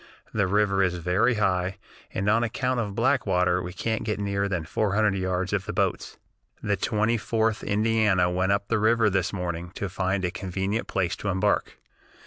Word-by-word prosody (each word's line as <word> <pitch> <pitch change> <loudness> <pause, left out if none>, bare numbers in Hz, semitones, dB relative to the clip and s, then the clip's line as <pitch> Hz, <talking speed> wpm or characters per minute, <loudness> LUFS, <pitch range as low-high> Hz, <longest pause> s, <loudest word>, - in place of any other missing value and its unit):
The 100 -3 +1
river 100 0 +2
is 90 -2 +2
very 90 +8 +1
high, 95 -3 0 0.3
and 100 - -2
on 110 +3 +3
account 125 +2 -1
of 105 -4 -3
backwater 105 -8 +2
we 90 0 -5
can't 110 +4 -2
get 105 -2 -2
nearer 100 0 -1
than 90 -5 -2
four 100 +4 -1
hundred 105 -2 +3
yards 95 0 -1
of 100 -1 -1
the - - -3
boats. - - -1 0.5
"The - - +1
Twenty 110 +2 +1
fourth 110 0 0
Indiana 105 -3 +2
went 90 +2 0
up 100 0 0
the 115 - +1
river 110 0 +3
this 95 -2 0
morning 90 -2 -4
to 100 - -3
find 95 +1 -1
a 90 - -1
convenient 95 +3 -3
place 90 -3 -1
to - - -5
embark. 100 +2 0
100 Hz, 185 wpm, -26 LUFS, 95-110 Hz, 0.5 s, on